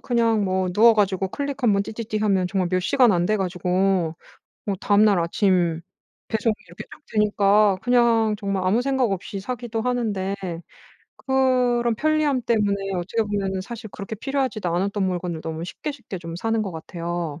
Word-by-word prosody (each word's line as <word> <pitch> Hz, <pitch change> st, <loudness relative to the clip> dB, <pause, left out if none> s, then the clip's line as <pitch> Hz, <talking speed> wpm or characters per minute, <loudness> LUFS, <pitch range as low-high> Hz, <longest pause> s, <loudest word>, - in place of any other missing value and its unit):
그냥 230 Hz, -3 st, +1 dB
뭐 185 Hz, -1 st, 0 dB
누워 225 Hz, +4 st, +6 dB
가지고 195 Hz, -3 st, +1 dB
클릭 280 Hz, +3 st, -4 dB
한번 200 Hz, -3 st, +3 dB
띠띠띠 220 Hz, 0 st, -4 dB
하면 195 Hz, -4 st, +2 dB
정말 185 Hz, -2 st, 0 dB
몇 185 Hz, +1 st, +1 dB
시간 245 Hz, +5 st, +4 dB
안 175 Hz, -1 st, +1 dB
돼 215 Hz, -, +2 dB
가지고 180 Hz, -2 st, 0 dB, 0.5 s
뭐 200 Hz, -, 0 dB
다음날 205 Hz, -1 st, +4 dB
아침 170 Hz, -1 st, +1 dB, 0.5 s
배송이 220 Hz, 0 st, +1 dB
이렇게 -, -, -9 dB
쭉 -, -, -13 dB
되니까 210 Hz, -1 st, +3 dB
그냥 235 Hz, -3 st, +3 dB
정말 195 Hz, -2 st, -2 dB
아무 210 Hz, +6 st, +3 dB
생각 265 Hz, -4 st, +1 dB
없이 195 Hz, +2 st, -5 dB
사기도 235 Hz, +1 st, -4 dB
하는데 220 Hz, -6 st, -1 dB, 0.8 s
그런 250 Hz, -3 st, +2 dB
편리함 300 Hz, -1 st, +1 dB
때문에 210 Hz, -4 st, +1 dB, 0.2 s
어떻게 190 Hz, +6 st, -1 dB
보면은 195 Hz, -3 st, -2 dB
사실 220 Hz, +1 st, -8 dB
그렇게 200 Hz, +2 st, -7 dB
필요하지도 260 Hz, -5 st, -2 dB
않았던 195 Hz, +4 st, -1 dB
물건을 175 Hz, -2 st, -3 dB
너무 160 Hz, +1 st, -5 dB
쉽게 290 Hz, -, -5 dB
쉽게 245 Hz, -8 st, -8 dB
좀 165 Hz, -1 st, -7 dB
사는 225 Hz, +4 st, 0 dB
것 200 Hz, -, -4 dB
같아요. 170 Hz, -1 st, -5 dB
205 Hz, 350 characters per minute, -23 LUFS, 185-235 Hz, 0.8 s, 누워